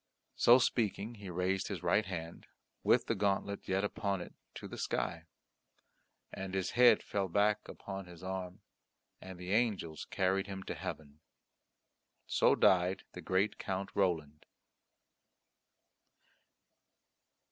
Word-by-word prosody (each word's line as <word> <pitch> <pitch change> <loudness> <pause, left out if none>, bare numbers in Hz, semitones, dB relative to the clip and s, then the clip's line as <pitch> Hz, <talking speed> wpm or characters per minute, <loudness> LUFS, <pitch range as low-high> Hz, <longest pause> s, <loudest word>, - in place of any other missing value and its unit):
So 120 - +7
speaking 115 -3 0
he 100 -4 -9
raised 90 +2 0
his 95 -3 -5
right 100 +5 +2
hand, 85 -3 -6 0.3
with - - +3
the - - 0
gauntlet 100 0 -1
yet 95 +1 +1
upon 100 -1 -1
it, 90 - -8 0.2
to - - -7
the - - -8
sky, - - -2 1.1
and 95 0 -5
his 95 -1 -1
head 125 0 +6
fell 100 -2 -1
back 105 +3 +1
upon 95 -2 -7
his 90 0 -12
arm 95 +1 -5 0.6
and 95 -1 -9
the 90 +1 -6
angels 100 -8 0
carried 95 0 0
him 95 -1 -6
to - - -4
heaven. 75 -1 -7 1.1
So - - +3
died 90 0 +3
the - - -7
great 95 +3 0
Count 95 0 -3
Roland. 80 -6 -1
95 Hz, 125 wpm, -33 LUFS, 90-100 Hz, 1.1 s, So